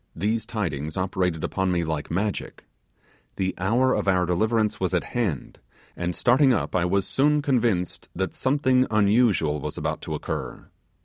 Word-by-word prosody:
These 110 +5 -1
tidings 80 -9 -3
operated 90 -3 -1
upon 95 -1 0
me 85 -1 +1
like 80 -2 -3
magic. 100 +5 -3 0.7
The 95 -1 -1
hour 120 +8 +2
of - - -1
our 90 -2 +3
deliverance 110 +5 +1
was 95 -1 0
at 85 - +1
hand, 105 - -2 0.4
and 85 0 -3
starting 130 +2 +4
up, 115 - -1
I 90 -1 +2
was 95 +2 +1
soon 150 +2 +2
convinced 115 - 0
that 95 +1 -2
something 130 -1 +2
unusual 100 -8 +3
was - - -5
about - - -3
to - - -4
occur. - - -5
100 Hz, 160 wpm, -25 LUFS, 90-120 Hz, 0.7 s, starting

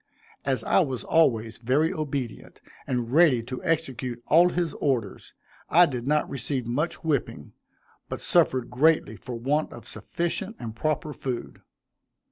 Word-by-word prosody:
As 130 -4 0
I - - +3
was 135 -9 -1
always 115 -10 +2
very 140 +9 +1
obedient, 140 - -5 0.3
and 125 -1 -2
ready 150 -7 +5
to 125 +2 -7
execute 130 -7 -2
all 170 +3 +5
his 175 -3 -1
orders, 135 -5 -2 0.3
I 175 +2 +7
did 125 -5 -4
not 150 +1 +2
receive 130 -1 -3
much 150 +10 -2
whipping, 140 - -2 0.6
but - - -4
suffered 130 -2 +2
greatly 135 -4 +3
for 120 +5 -7
want 140 +6 0
of - - -11
sufficient 190 +5 -3
and 110 -2 -7
proper 155 +3 -1
food. 130 -4 -5
135 Hz, 140 wpm, -26 LUFS, 120-160 Hz, 0.6 s, I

